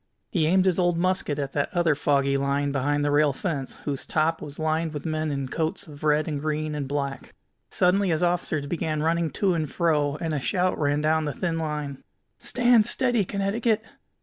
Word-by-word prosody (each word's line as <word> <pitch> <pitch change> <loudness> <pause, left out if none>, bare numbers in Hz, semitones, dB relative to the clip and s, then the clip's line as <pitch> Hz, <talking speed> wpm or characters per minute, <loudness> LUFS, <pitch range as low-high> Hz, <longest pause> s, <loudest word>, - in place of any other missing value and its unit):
He 160 -5 +2
aimed 185 +3 +3
his 185 -1 +2
old 175 -1 +2
musket 185 -4 0
at 140 -2 -3
that 140 0 -1
other 170 -3 +3
foggy 140 -1 +1
line 140 +1 0
beyond 145 +2 0
the 145 - +1
rail 145 -1 +3
fence, 140 -4 -4
whose 140 -2 -3
top 160 +1 0
was 145 -1 -8
lined 160 0 -1
with 145 - -5
men 155 -1 -1
in 140 -2 -2
coats 160 +8 -2
of 150 -3 -12
red 150 0 +2
and 145 -3 -3
green 155 0 -2
and 145 -2 -3
black. 140 -1 -4 0.3
Suddenly 185 +2 +2
his 165 +1 +1
officers 175 -4 0
began 155 -1 -2
running 165 0 +1
to 190 +6 +1
and 155 -4 -2
fro, 150 -4 +1
and 160 +1 -3
a 150 - 0
shout 185 +6 0
ran 145 0 +1
down 155 +1 +2
the 150 - -2
thin 170 -3 -1
line: 150 -3 -4 0.4
"Stand 240 -3 +3
steady, 245 -5 +1
Connecticut! 210 +4 0
155 Hz, 200 wpm, -25 LUFS, 145-175 Hz, 0.4 s, aimed